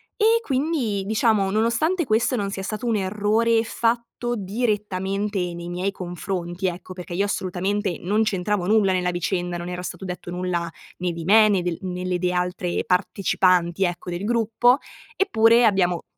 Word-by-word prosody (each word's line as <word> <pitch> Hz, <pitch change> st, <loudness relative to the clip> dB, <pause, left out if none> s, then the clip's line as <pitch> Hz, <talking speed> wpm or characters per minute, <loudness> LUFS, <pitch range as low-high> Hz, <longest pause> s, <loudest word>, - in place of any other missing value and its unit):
E 450 Hz, +1 st, +4 dB
quindi, 265 Hz, -, -1 dB
diciamo, 215 Hz, -1 st, +2 dB
nonostante 235 Hz, -, +1 dB
questo 230 Hz, +2 st, +2 dB
non 200 Hz, -2 st, -2 dB
sia 195 Hz, -, -4 dB
stato 215 Hz, +4 st, -4 dB
un 230 Hz, -2 st, +1 dB
errore 215 Hz, +3 st, +2 dB
fatto 235 Hz, +1 st, -1 dB
direttamente 200 Hz, -1 st, -1 dB
nei 170 Hz, 0 st, -7 dB
miei 180 Hz, +3 st, -2 dB
confronti, 175 Hz, 0 st, -4 dB
ecco, 180 Hz, +1 st, -5 dB
perché 180 Hz, -1 st, -8 dB
io 195 Hz, +3 st, +1 dB
assolutamente 190 Hz, 0 st, -2 dB
non 205 Hz, +5 st, 0 dB
c'entravo 195 Hz, -2 st, -1 dB
nulla 205 Hz, -2 st, +3 dB
nella 180 Hz, -1 st, 0 dB
vicenda, 175 Hz, 0 st, -2 dB
non 175 Hz, 0 st, -6 dB
era 180 Hz, 0 st, -4 dB
stato 185 Hz, +1 st, -6 dB
detto 180 Hz, -1 st, -6 dB
nulla 175 Hz, -1 st, -2 dB, 0.3 s
né 180 Hz, 0 st, -1 dB
di 165 Hz, -1 st, -6 dB
me, 215 Hz, +3 st, +6 dB
né 195 Hz, -3 st, +2 dB
del 175 Hz, -2 st, -2 dB
né 180 Hz, -1 st, -4 dB
delle 180 Hz, 0 st, 0 dB
altre 180 Hz, 0 st, -1 dB
partecipanti, 180 Hz, -1 st, +2 dB
ecco, 175 Hz, 0 st, -2 dB
del 175 Hz, +2 st, -4 dB
gruppo, 235 Hz, +3 st, +3 dB, 0.4 s
eppure 230 Hz, -, +4 dB
abbiamo 180 Hz, -5 st, +2 dB
195 Hz, 160 wpm, -23 LUFS, 180-220 Hz, 0.4 s, me